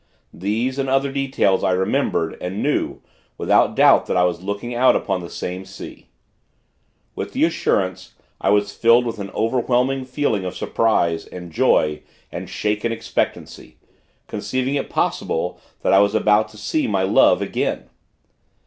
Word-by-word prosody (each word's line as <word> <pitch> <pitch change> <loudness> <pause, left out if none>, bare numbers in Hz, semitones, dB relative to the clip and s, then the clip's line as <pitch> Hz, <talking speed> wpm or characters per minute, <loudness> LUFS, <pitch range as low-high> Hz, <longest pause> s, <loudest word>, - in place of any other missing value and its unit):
These, 115 +8 -2
and 135 -1 -1
other, 135 +1 +1
details, 135 -8 +1
I 95 - +2
remembered, 90 -3 0
and 95 +3 -3
knew, 150 - -1 0.4
without - - +2
doubt - - +5
that - - 0
I 90 - +4
was 90 -1 0
looking 100 +5 -4
out 125 +2 +4
upon 95 -3 -1
that 85 - -8
same 90 +1 -5
sea. 95 +1 -11 1.1
With - - -6
the - - +1
assurance, - - 0 0.3
I - - +1
was 100 0 +2
filled 115 +1 +4
with 115 -2 -4
an 100 -1 -5
overwhelming 125 +3 +1
feeling 130 -6 -1
of 90 0 -5
surprise, 85 -7 0
and 90 -1 -9
joy, 75 -1 +2 0.3
and - - -6
shaken 105 +2 -1
expectancy, 115 0 -4 0.5
conceiving 130 +1 -2
it 145 - -2
possible 85 +2 -1 0.2
that - - +2
I 95 - +7
was 100 +1 +3
about 105 0 +3
to 105 - -15
see 105 +9 -1
my 95 -3 0
Love, 95 - +4
again. - - -2
105 Hz, 155 wpm, -21 LUFS, 95-125 Hz, 1.1 s, I